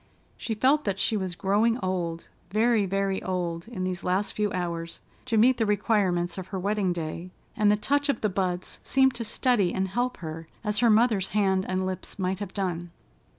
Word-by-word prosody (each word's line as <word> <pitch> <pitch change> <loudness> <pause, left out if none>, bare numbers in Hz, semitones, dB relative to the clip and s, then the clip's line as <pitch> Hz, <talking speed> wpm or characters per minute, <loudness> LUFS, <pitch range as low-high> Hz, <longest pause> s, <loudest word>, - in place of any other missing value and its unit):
She 225 - -4
felt 275 +7 +3
that 200 -2 0
she 220 - +2
was 190 -4 -2
growing 210 +5 +2
old, 175 -6 -3 0.2
very, 215 0 +2
very 195 0 0
old, 175 -1 -3
in 200 -6 -5
these 185 -1 -3
last 185 +3 0
few 210 -1 0
hours, 170 -2 -3 0.3
to 235 -3 0
meet 245 +3 +5
the 225 - +1
requirements 195 -4 +1
of 185 - -7
her 195 - -4
wedding 200 0 0
day, 170 +1 -4 0.3
and 210 -1 +3
the 210 - +4
touch 285 +6 +1
of 275 - 0
the 215 - +2
buds 185 -2 -2
seemed 265 -1 +3
to 235 - -4
steady 220 -4 +2
and 190 0 0
help 245 +5 -1
her, 160 -1 -7 0.2
as 210 -1 0
her 240 - +4
mother's 215 -3 +4
hand 190 -2 +2
and 185 0 0
lips 185 +2 -5
might 185 -1 -1
have 205 -2 -5
done. 175 -3 -2
195 Hz, 195 wpm, -27 LUFS, 180-220 Hz, 0.3 s, meet